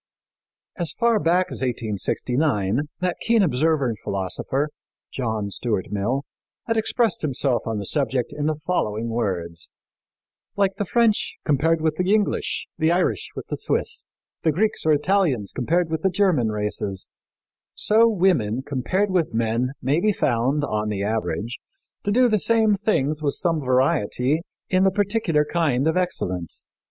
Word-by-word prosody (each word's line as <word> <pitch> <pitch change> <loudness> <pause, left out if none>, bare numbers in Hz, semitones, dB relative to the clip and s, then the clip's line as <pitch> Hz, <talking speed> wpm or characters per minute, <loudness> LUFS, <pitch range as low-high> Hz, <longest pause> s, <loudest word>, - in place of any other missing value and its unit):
As 170 -2 -2
far 235 -2 +3
back 180 +1 +2
as - - -5
1869 120 +1 0
that 180 -1 0
keen 230 -2 +3
observer 155 -2 +2
and 110 -4 -3
philosopher, 100 +9 -2 0.4
John 110 -5 -2
Stuart 105 -4 -2
Mill, 110 +7 -1 0.4
had 225 - 0
expressed 225 -1 +1
himself 135 -4 0
on 110 -1 -1
the 100 - -4
subject 130 -1 -1
in 150 0 -1
the 155 - +1
following 115 -10 -1
words: 90 -7 -3 0.9
"Like 195 -1 +1
the 205 - -1
French 230 +1 +2
compared 160 +3 +2
with 155 -1 0
the 180 +2 +1
English, 210 -2 -1
the 160 +1 +3
Irish 175 - 0
with - - -6
the - - -1
Swiss, - - -1 0.3
the 160 - +2
Greeks 200 +1 0
or - - +5
Italians 150 - +1
compared 165 +6 0
with 160 -1 -1
the 190 - +3
German 180 - +2
races, 105 -2 -3 0.7
so 225 +2 +4
women 160 - +1
compared 185 +10 -1
with 170 -10 0
men 115 +3 0
may 140 +5 +2
be 210 +3 +2
found, 135 +1 +1
on 105 -5 -1
the 100 -2 -2
average, 110 +2 -2 0.5
to 205 - +1
do 250 +4 +5
the 215 -3 +2
same 220 0 +3
things 155 -7 0
with 145 -2 0
some 170 -4 +1
variety 130 +2 +1 0.3
in 185 0 +2
the 195 - +5
particular 195 -6 +1
kind 150 -5 +1
of 160 - +2
excellence. 90 - -1
150 Hz, 155 wpm, -23 LUFS, 115-185 Hz, 0.9 s, or